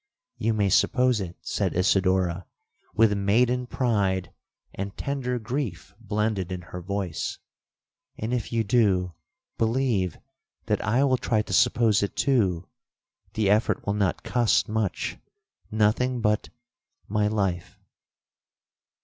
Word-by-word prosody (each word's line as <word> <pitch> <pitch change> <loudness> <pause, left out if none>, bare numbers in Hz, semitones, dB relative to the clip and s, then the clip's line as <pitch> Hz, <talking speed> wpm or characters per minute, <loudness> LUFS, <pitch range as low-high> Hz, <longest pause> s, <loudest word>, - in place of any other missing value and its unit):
'—'You 115 0 +1
may 100 -2 +2
suppose 125 +3 +3
it,' 90 -2 -6
said - - -2
Isidora, 95 -2 +1 0.5
with 110 -1 +4
maiden 120 +5 +2
pride 100 -8 0 0.4
and 100 +1 -5
tender 130 -3 -2
grief 120 +1 -4
blended 105 -3 -1
in 90 -1 -5
her 90 +2 -8
voice; 95 -3 -3 0.8
'and 110 +3 -3
if 120 -3 -2
you 115 -1 +1
do, 100 -5 +2 0.5
believe 115 - +1 0.5
that 105 -3 0
I 120 +6 +2
will 130 -2 +3
try 110 -3 0
to 95 - -6
suppose 115 +2 +4
it 100 - -2
too; 95 -11 +1 0.7
the 105 -3 +2
effort 105 +2 +1
will 100 - 0
not 100 -3 0
cost 120 -3 +2
much,—nothing 110 +2 -2
but—my 105 -1 -3
life!' 95 -5 -2
105 Hz, 115 wpm, -26 LUFS, 95-120 Hz, 0.8 s, with